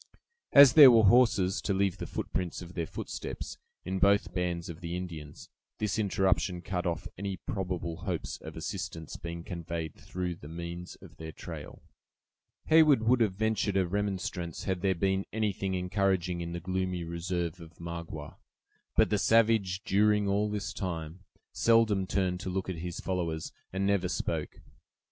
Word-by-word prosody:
As 140 -3 +9
there 145 -3 +11
were 115 -2 +6
horses, 100 -4 +4
to 100 - 0
leave 95 -2 +1
the - - -4
prints 90 0 -3
of 85 +1 -11
their 85 -3 -2
footsteps, - - -6 0.3
in 95 +1 -2
both 100 +2 +3
bands 90 -2 -2
of 85 0 -8
the 85 0 -3
Indians, 80 -5 -7 0.3
this 105 +1 -1
interruption 95 -3 +1
cut 90 -2 -2
off 85 - -2
any 100 -1 -3
probable 90 -5 -3
hopes - - -4
of 80 0 -9
assistance 85 -1 -5
being 85 0 -6
conveyed 85 -3 -5
through 90 -2 -5
the 75 - -11
means 85 +2 -6
of - - -14
their 80 0 -7
trail. - - -9 0.8
Heyward 155 -7 +6
would 120 +2 +3
have 105 -5 +2
ventured 110 -1 0
a 95 - +3
remonstrance 95 -3 -3
had 95 -3 -2
there 95 -1 +2
been 95 +2 +1
anything 100 -3 -1
encouraging 90 -1 0
in 85 0 -4
the 85 - -3
gloomy 90 0 -2
reserve 85 +1 -3
of 85 0 -13
Magua. 85 -1 -7 0.6
But - - +4
the 105 - +2
savage, 110 -4 +3
during 105 +1 +3
all 100 +2 +1
this 105 -1 -3
time, 85 -1 -5 0.3
seldom 110 -4 +3
turned 90 -2 0
to 95 - -4
look 95 +1 -2
at 90 - -3
his 85 +1 -5
followers, 85 -4 -2 0.2
and 95 +1 -1
never 100 -2 +1
spoke. - - -3
95 Hz, 160 wpm, -30 LUFS, 85-100 Hz, 0.8 s, there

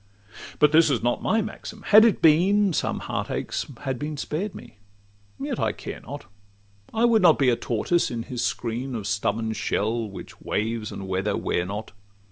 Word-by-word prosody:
But 150 0 +5
this 160 0 +6
is 130 -5 0
not 120 0 +1
my 225 -1 +1
maxim: 215 0 -8
had 215 +1 +9
it 225 - +2
been, 185 +5 +5
Some - - -1
heart - - -3
aches - - -3
had 135 -3 -3
been 150 +1 -4
spared 180 +8 -3
me: 120 -4 -12 0.6
yet - - -3
I - - +1
care - - -7
not— - - -9 0.7
I 225 +2 +2
would 230 -2 +4
not 170 -4 +6
be 135 -3 +3
a 120 - +3
tortoise 120 +10 0
in 115 -2 -4
his 120 0 -4
screen 120 +3 -2
Of 110 -3 -4
stubborn 110 +1 -1
shell, 110 +1 -1
which 100 - -11
waves 110 0 -2
and 95 - -7
weather 95 +2 -1
wear 85 - -1
not. 105 +3 -5
125 Hz, 185 wpm, -25 LUFS, 110-175 Hz, 0.7 s, had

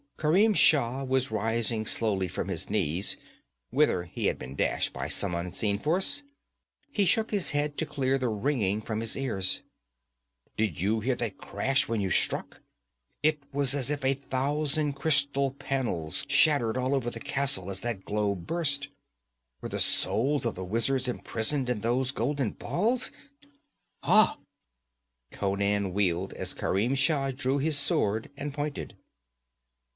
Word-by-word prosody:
Kerim 190 +8 +3
Shah 135 -5 +4
was 130 -2 0
rising 110 0 +1
slowly 100 -5 +2
from 90 - -4
his 95 -5 -3
knees, 95 -3 +1 0.5
whither 130 -9 +2
he 85 - -5
had - - 0
been 65 +2 -9
dashed - - +1
by - - -4
some 95 -3 +3
unseen 90 +4 -1
force. 190 - +2 0.7
He 205 -7 +1
shook 220 +5 +2
his 205 -3 +1
head 145 0 -1
to 160 - -2
clear 135 -1 0
the 125 -2 0
ringing 110 -3 0
from 110 0 -4
his 115 0 -1
ears. 100 -9 0 1.0
'Did 105 -9 -1
you 105 +5 +1
hear 125 +4 0
that 115 -4 -4
crash 130 +7 0
when 115 -2 -1
you 95 -2 -2
struck? - - 0 0.6
It 155 -1 +2
was 140 -1 +1
as 140 -2 0
if 145 -2 -2
a 135 - +3
thousand 145 +2 -1
crystal 140 -1 +1
panels 135 - -3
shattered 140 -5 +3
all 130 +2 0
over 125 -3 -1
the 115 - -7
castle 135 -8 +1
as 95 - -4
that 115 -5 -4
globe 100 -4 -2
burst. 145 -4 0 0.7
Were - - -6
the - - -4
souls 135 +4 +1
of 115 - 0
the 95 - -6
wizards 125 +6 +1
imprisoned 125 +2 0
in 120 -4 -1
those 125 +3 0
golden 135 -2 -1
balls? 235 +7 -1 0.9
Ha!' - - +5 0.9
Conan 100 -1 -1
wheeled 90 -4 0
as - - -3
Kerim 110 +7 0
Shah 135 0 +2
drew 130 +1 -1
his 150 +1 +2
sword 110 -6 0
and 145 0 -5
pointed. 145 0 -5
130 Hz, 150 wpm, -28 LUFS, 105-145 Hz, 1.0 s, Ha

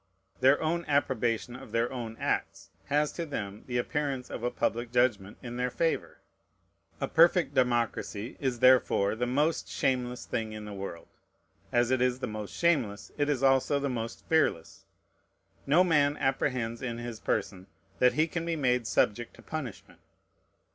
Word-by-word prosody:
Their 135 +3 +5
own 170 +2 0
approbation 120 -4 0
of 135 +2 -11
their 115 +1 0
own 115 -3 -5
acts - - -2
has 150 +1 +1
to 170 - -4
them 105 -10 -6
the 125 -1 -2
appearance 140 0 -2
of - - -5
a 120 - 0
public 120 0 -2
judgment 120 -5 +1
in 120 -1 -6
their 125 0 0
favor. 165 +6 -1 0.8
A - - -1
perfect 165 -3 +4
democracy 120 -3 0
is 130 -4 -2
therefore 125 -6 +4
the 125 +2 -2
most 150 +6 0
shameless 125 -1 -1
thing 110 -2 -3
in 105 0 -7
the 105 - -7
world. 95 -4 -7 0.6
As 120 0 +2
it 130 -1 +2
is 125 0 +2
the 130 - -3
most 105 -3 -6
shameless, 125 - 0
it 145 0 0
is 135 -3 0
also 135 +1 +3
the 140 0 -1
most 115 -2 -5
fearless. 160 - 0 0.8
No 160 +6 +5
man 150 -4 +3
apprehends 125 -3 -1
in 120 -2 -3
his 120 -2 -6
person 95 -4 -2 0.3
that 125 0 +5
he 155 - +3
can 165 +1 -4
be 165 0 -1
made 125 -5 +1
subject 120 +2 0
to - - -16
punishment. 145 -10 -7
125 Hz, 165 wpm, -29 LUFS, 115-145 Hz, 0.8 s, Their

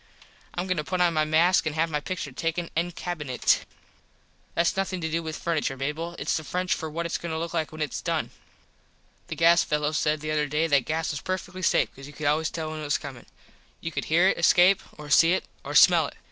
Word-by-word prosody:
Im 175 - -1
goin 185 -1 -1
to 150 - -1
put 185 +4 -3
on 175 -1 +3
my 155 -1 +2
mask 165 +3 +3
an 155 - -1
have 160 +1 0
my 150 - 0
pictur 155 -2 -5
took 165 +6 -2
en 175 0 -2
cabinet. 150 -8 0 0.9
Thats 170 0 +2
nothin 190 -1 -2
to 160 -1 -3
do 165 +1 0
with 160 -1 -5
furniture, 155 -5 -1
Mable. 155 +5 -3
Its 140 - -1
the 155 - -2
French 180 +4 -1
for 160 - -4
what 170 +2 -4
its 170 - -2
goin 170 - -5
to 160 - -2
look 165 +1 -4
like 160 -2 -1
when 155 0 -3
its 145 - -4
done. - - -2 1.0
The - - -5
gas 170 +1 +5
fello 150 0 0
said 155 0 0
the 155 0 -3
other 150 -1 +1
day 150 +3 0
that 140 -5 +2
gas 160 +1 -1
was 145 - -5
perfectly 185 0 -4
safe 170 - +2
cause 135 +1 -11
you 145 - -12
could 155 - -6
always 155 +2 +2
tell 160 -1 -4
when 155 - -5
it - - -6
was 145 0 +1
comin. 135 -5 -10 0.5
You 165 - -5
could - - -3
hear 170 +4 +4
it - - -1
escape 180 +3 +5 0.2
or 150 -1 -9
see 165 +4 +6
it - - 0 0.2
or - - -6
smell - - +6
it. - - -12
160 Hz, 245 wpm, -26 LUFS, 150-170 Hz, 1.0 s, see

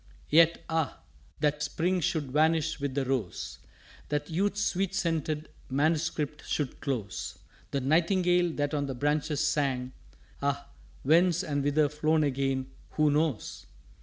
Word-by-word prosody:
"_Yet, 165 +2 +6
ah, 160 -3 -1 0.4
that 150 0 +1
Spring 180 +4 0
should 150 -4 -1
vanish 160 +2 +2
with 140 -2 -3
the 140 -2 0
Rose! 125 -8 -3 0.5
That 150 +3 -2
Youth's 205 +4 +1
sweet 195 -1 0
scented 160 -4 -1 0.2
Manuscript 150 +1 0
should 145 -4 -2
close! 120 -9 -3 0.3
The 140 - -1
Nightingale 175 +4 +3
that 145 0 -1
on 145 -1 0
the 135 - -4
branches 150 +2 0
sang, 130 -4 0 0.5
Ah, 140 0 -1 0.3
whence, 175 +5 +4
and 145 -4 -1
whither 145 +1 +3
flown 155 +2 +1
again, 135 -1 -1 0.2
who 155 -1 +3
knows? 150 -5 -1
150 Hz, 135 wpm, -29 LUFS, 140-165 Hz, 0.5 s, Yet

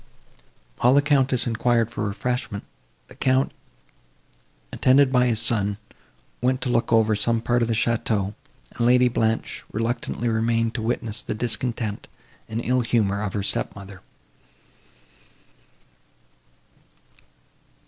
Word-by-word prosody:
While 125 +3 +4
the 145 - +6
Countess 135 -4 +2
enquired 115 -1 +1
for 105 - -4
refreshment, 105 +1 -3 0.4
the - - -15
Count, 130 +1 +1 1.2
attended 130 +1 +4
by 125 -1 +3
his 115 -3 +1
son, 105 -3 +2 0.6
went 130 +1 +1
to 125 - -2
look 120 -1 0
over 110 -1 +4
some 115 +2 +1
part 120 +1 0
of 115 - +1
the 115 - 0
château, 110 -3 0 0.4
and 120 0 +1
Lady 125 0 +5
Blanche 110 -1 -1
reluctantly 115 +1 -2
remained 115 0 +1
to 120 - -4
witness 110 -1 -2
the - - -4
discontent 115 -1 -2 0.4
and 115 +2 -4
ill 125 0 +2
humour 105 -4 0
of 105 -3 -3
her 100 - -2
step - - -1
mother. 95 -2 -11
115 Hz, 125 wpm, -23 LUFS, 110-125 Hz, 1.2 s, the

